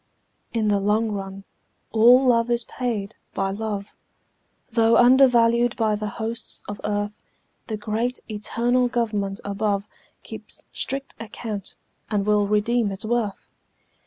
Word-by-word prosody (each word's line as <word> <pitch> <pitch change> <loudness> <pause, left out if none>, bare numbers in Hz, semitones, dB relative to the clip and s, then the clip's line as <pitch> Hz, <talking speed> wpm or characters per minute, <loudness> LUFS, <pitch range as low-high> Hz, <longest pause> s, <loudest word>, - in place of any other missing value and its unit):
In 225 -2 0
the 205 -1 +3
long 215 +3 +1
run 195 -1 -5 0.5
all 245 +4 +6
love 235 -1 +3
is 235 0 +1
paid 225 -5 -3 0.2
by 195 -1 0
love, 205 -1 -4 0.8
Though 230 0 +4
undervalued 240 -2 +5
by 220 -3 +1
the 210 0 -3
hosts 225 +2 -5
of 205 0 -6
earth; 205 0 -2 0.5
The 220 - -3
great 225 +4 -2
eternal 235 +3 +1
Government 210 -5 -1
above 200 0 -1 0.4
Keeps - - -8
strict 275 0 -2
account 220 -2 -6 0.3
and 205 -2 0
will 210 -1 +3
redeem 210 +1 +1
its 195 +2 -5
worth. 220 -3 -1
220 Hz, 130 wpm, -24 LUFS, 205-235 Hz, 0.8 s, all